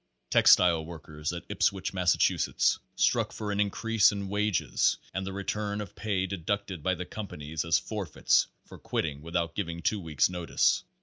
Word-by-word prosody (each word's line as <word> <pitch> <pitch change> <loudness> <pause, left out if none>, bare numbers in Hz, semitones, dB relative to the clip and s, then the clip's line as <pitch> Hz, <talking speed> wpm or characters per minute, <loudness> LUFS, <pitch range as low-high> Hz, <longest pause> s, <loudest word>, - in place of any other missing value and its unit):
Textile 85 -3 +6
workers 80 -2 -6
at 85 -1 -7
Ipswich, 95 -1 0
Massachusetts, 90 -2 +2 0.2
struck - - +2
for 105 -1 -4
an 100 - -2
increase 105 +2 +3
in 100 -1 -4
wages 105 -1 +1 0.2
and 95 +1 -3
the - - -3
return 100 +1 -3
of 105 -4 -6
pay 100 -4 -1
deducted 100 -1 -3
by 95 +3 +1
the 90 +1 -5
companies 80 -7 -5
as 85 -2 +3
forfeits 100 -8 +1 0.2
for - - -13
quitting 75 -3 -3
without 85 +1 -2
giv 100 -3 -3
ing 85 0 -6
two 105 - +1
weeks' 80 -7 +1
notice. 90 -2 +1
95 Hz, 165 wpm, -29 LUFS, 85-100 Hz, 0.2 s, Textile